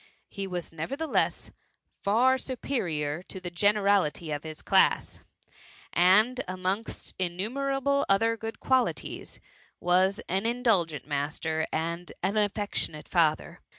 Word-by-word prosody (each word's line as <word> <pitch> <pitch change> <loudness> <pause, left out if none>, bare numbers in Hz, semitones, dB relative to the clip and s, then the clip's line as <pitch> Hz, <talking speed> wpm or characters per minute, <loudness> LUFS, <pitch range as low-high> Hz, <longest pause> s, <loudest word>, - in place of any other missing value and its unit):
He 195 -2 -5
was 180 -3 -5
nevertheless 275 - -1 0.5
far 250 +6 +3
superior 175 - -2
to 190 - -9
the 180 -1 -6
gene 205 +4 +3
rality 185 -6 +1
of 145 - -6
his 155 -1 -8
class, - - +3 0.7
and 215 +9 +4
amongst 185 +4 -3
innumerable 270 +10 0
other 225 +4 +3
good 225 0 -6
qualities,, 260 -1 -1 0.4
was 185 +4 +3
an 190 +5 0
indulgent 210 - +1
master 155 +2 -2
and 170 +2 -3
an 195 +3 +1
affectionate 205 -7 -1
father. 160 -4 +1
190 Hz, 115 wpm, -28 LUFS, 170-230 Hz, 0.7 s, and